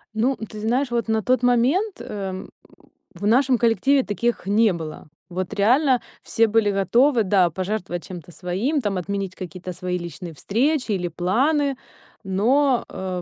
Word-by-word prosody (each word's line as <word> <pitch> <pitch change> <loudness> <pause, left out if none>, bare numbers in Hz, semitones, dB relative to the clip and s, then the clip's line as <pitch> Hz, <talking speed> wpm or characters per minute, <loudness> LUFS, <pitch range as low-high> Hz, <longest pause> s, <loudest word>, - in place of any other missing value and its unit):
Ну, 255 +5 +1
ты 215 -1 -8
знаешь, 245 +4 0
вот 235 -1 -1
на 220 -1 0
тот 255 -1 +2
момент, 265 - +2
эм, 190 -2 -6 0.7
в 195 - -6
нашем 250 +3 +4
коллективе 255 +4 +3
таких 235 0 -2
не 210 +1 +3
было. 155 -2 -7 0.2
Вот 185 +1 -4
реально 250 +5 +3 0.2
все 230 - +2
были 220 -1 +2
готовы, 230 +6 +3
да, 185 -2 +3
пожертвовать 185 0 -4
чем-то 175 -2 -9
своим, 195 - -1
там 205 -3 -1
отменить 195 +1 -3
какие-то 180 0 -7
свои 180 0 -3
личные 170 0 -7
встречи 255 - 0
или 180 -3 -1
планы, 265 - +1 0.5
но, 245 +8 +2
э, 185 -1 -5
210 Hz, 150 wpm, -23 LUFS, 185-250 Hz, 0.7 s, нашем